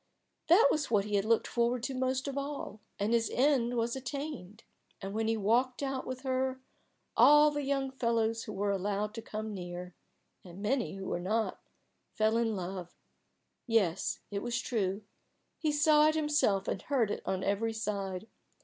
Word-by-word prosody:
That 415 +10 +7
was 300 - 0
what 205 -3 +2
he 210 - -5
had 200 0 +2
looked 230 0 +3
forward 235 0 0
to 270 - -2
most 260 +1 -1
of 275 - -3
all, 280 -7 -4 0.2
and 205 +3 0
his 230 -1 +2
end 250 -3 +2
was 235 +1 0
attained. 265 -6 -6 0.4
And 195 -1 -6
when 220 +1 0
he 225 0 +1
walked 245 +6 +1
out 270 -1 -3
with 255 0 -5
her, 260 -1 -1 0.6
all 295 +1 +7
the 290 0 -2
young 275 -1 -1
fellows 230 -3 0
who 210 - -6
were 200 +1 0
allowed 200 +2 -1
to 225 - -6
come 215 -1 -5
near 180 -1 -6 0.5
and 180 0 -11
many 225 0 -1
who 195 0 -6
were - - -2
not 215 +5 -1 0.5
fell 220 +1 +2
in 225 -2 +1
love. 180 -1 -6 0.7
Yes, 200 -7 +1
it 200 0 -2
was 240 0 -2
true; 205 -5 -1 0.6
he 310 -2 +1
saw 300 +1 +5
it 310 - +2
himself 295 -11 +2
and 195 - -2
heard 245 -7 +1
it - - -3
on 190 0 -2
every 210 +3 0
side. 200 -3 -3
230 Hz, 175 wpm, -31 LUFS, 200-265 Hz, 0.7 s, That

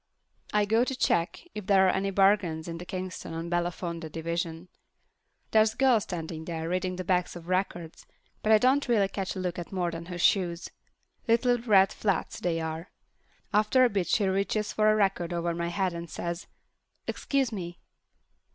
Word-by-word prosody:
I 210 -1 +3
go 225 +3 +3
to 265 +1 -2
check 175 - 0
if 210 -3 -7
there 195 -1 +5
are 185 - +4
any 195 +1 -1
bargains 195 -5 +2
in 165 0 -5
the 180 - -9
Kingston 185 -3 -5
or 165 - -3
Belafonte 170 -1 -3
division. 165 +1 -3 0.8
There's 220 0 +4
a - - -29
girl 260 -4 +5
standing 165 -4 -5
there 165 -1 -4
reading 185 +1 -1
the 185 - -4
backs 180 -1 0
of 170 -1 -10
records, 180 -3 -2 0.3
but 215 - +1
I 220 - +8
don't 260 +6 +3
really 215 -5 +3
catch 195 0 -4
a - - -4
look 180 -1 -3
at 175 - -7
more 180 -3 -1
than 165 0 -7
her 180 -1 -5
shoes—little 205 +7 0
red 200 -5 +4
flats 200 -5 -1
they 170 -2 -1
are. 160 +2 -4 0.6
After 215 +5 +4
a 245 - +4
bit 195 -4 0
she 205 - +2
reaches 200 +2 0
for 215 0 +4
a - - +3
record 195 -4 +1
over 170 0 -1
my 170 0 -2
head 185 +1 -1
and 170 0 -6
says, 170 +2 -5 0.6
"Excuse 270 -4 0
me." 175 -4 -6
185 Hz, 180 wpm, -28 LUFS, 170-210 Hz, 0.8 s, I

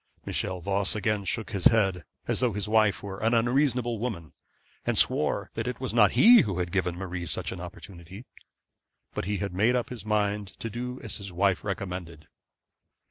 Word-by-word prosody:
Michel 95 -1 -2
Voss 100 +3 0
again 105 -1 -1
shook 110 +2 -3
his 100 -4 -4
head, 95 -7 +3 0.2
as - - 0
though 125 -3 +1
his 105 0 -2
wife 110 -1 +2
were 95 -1 -6
an 115 +2 +2
unreasonable 120 -1 +1
woman, 95 - -5 0.5
and - - 0
swore - - +2
that 115 +1 -3
it 125 - -4
was 130 -3 -3
not 110 -3 +5
he 235 0 +8
who 100 - -2
had 90 -1 -2
given 90 -3 0
Marie 90 -2 -5
such - - -3
opportunity. 90 +3 -10 0.9
But - - -3
he 105 +1 -1
made 110 +7 +2
up 120 - -1
his 125 -2 -7
mind 105 -1 0
to 115 - -5
do 125 +3 -5
as 110 - -5
his 100 -3 -7
wife 95 +1 +1
recommended. 90 -5 -5
105 Hz, 180 wpm, -27 LUFS, 95-115 Hz, 0.9 s, he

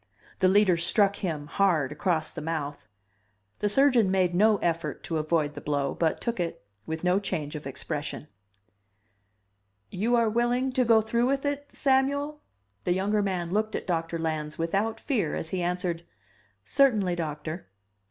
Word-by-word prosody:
The 185 - +4
Leader 190 -2 +4
struck 200 +4 +3
him, 160 -7 -3
hard, 155 -5 +1
across 155 +1 0
the - - -7
mouth. 150 -5 -4 0.7
The 205 - +1
surgeon 250 -3 +4
made 185 -2 +2
no 210 +4 +4
effort 170 -2 -2
to 160 -2 -2
avoid 155 -1 0
the 145 - -8
blow, 140 -2 -1
but 160 -2 0
took 235 -4 -3
it, 170 - -3 0.2
with 160 +1 -4
no 180 +2 +3
change 170 -7 -3
of 150 -2 -6
expression. 145 +2 -5 1.6
"YOU 225 +6 +1
ARE 230 -1 +3
WILLING 240 +4 +1
TO 255 -1 +1
GO 225 -1 +5
THROUGH 235 +3 +1
WITH 275 +1 0
IT, 285 0 -2
SAMUEL?" 285 +2 +1 0.4
The 175 - +2
younger 205 +3 +1
man 180 -4 -2
looked 215 +2 0
at - - -4
Doctor 165 -1 -1
Lans 155 -2 -3
without 200 +7 -1
fear 220 - -1
as 160 - -3
he 185 0 -2
answered, 175 -1 -1 0.6
"Certainly, 215 - +3
Doctor." 155 +1 -5
185 Hz, 160 wpm, -27 LUFS, 160-225 Hz, 1.6 s, GO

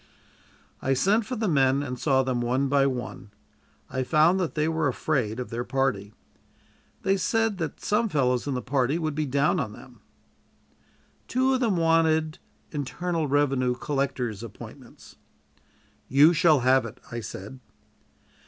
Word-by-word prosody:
I 135 - +1
sent 205 - +2
for 255 - -3
the 220 -2 -1
men 135 -3 +2
and 125 -3 -5
saw 135 -3 +2
them 130 -2 -1
one 130 +3 0
by 140 0 +3
one. 110 -6 -5 0.6
I 130 - -3
found 155 +7 +3
that 180 -4 -2
they 155 0 +1
were 160 -2 0
afraid 125 -4 -1
of 125 - -6
their 120 +1 -3
party. 120 -6 -1 0.9
They 195 0 +2
said 225 0 0
that 160 -4 -4
some 220 +2 0
fellows 125 -5 0
in 140 - -1
the 125 - -3
party 135 +3 0
would 155 -3 -2
be 155 0 -2
down 140 +6 +1
on 110 -7 -3
them. 120 -1 -15 1.3
Two 260 +2 +1
of 260 - +1
them 225 -7 +1
wanted 160 -1 +2 0.3
internal 160 +3 -2
revenue 135 -3 +1
collector's 130 -6 -2
appointments. 115 -4 -12 0.9
"You 145 +5 +6
shall 155 -4 +4
have 130 +1 +4
it," 105 - -12
I 120 - -4
said. 110 +3 -8
140 Hz, 155 wpm, -26 LUFS, 125-165 Hz, 1.3 s, You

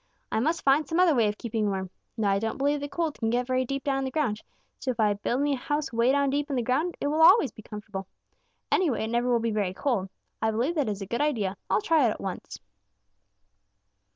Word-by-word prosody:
'I - - +1
must 320 +8 0
find 280 +3 +3
some 330 +1 0
other 360 -3 +5
way 230 -5 +3
of 210 0 -2
keeping 220 -3 -1
warm. 190 -2 -3 0.3
Now 205 -3 +2
I 195 - +2
don't 225 +1 -3
believe 285 +2 +1
the 285 0 -5
cold 325 -1 -2
can 225 - 0
get 245 +2 +1
very 255 0 0
deep 275 +2 -3
down 275 -1 0
in 270 - -2
the - - -2
ground, 250 -7 -1 0.4
so - - -4
if 245 - -2
I 210 -2 +3
build 235 +6 -1
me 290 0 +2
a - - -1
house 290 +1 -2
way 235 +2 +3
down 280 0 +2
deep 290 +1 -1
in 280 - -1
the 245 - 0
ground, 300 +9 0
it - - -3
always 320 - +5
will - - -49
be - - -8
comfortable. 210 -3 -7 0.6
Anyway, 300 -12 +2
it 220 - -3
never 240 +1 +1
will 240 -1 +3
be 230 0 -1
very 200 -3 -1
cold. 210 -8 -1 0.3
I 220 - +2
believe 235 +9 0
that 290 -9 0
is 200 -1 -3
a - - -5
good 235 +7 -2
idea. 220 -10 0
I'll - - +2
try 310 0 +3
it - - +2
at - - -4
once.' 190 -2 -6
245 Hz, 255 wpm, -27 LUFS, 215-290 Hz, 0.6 s, other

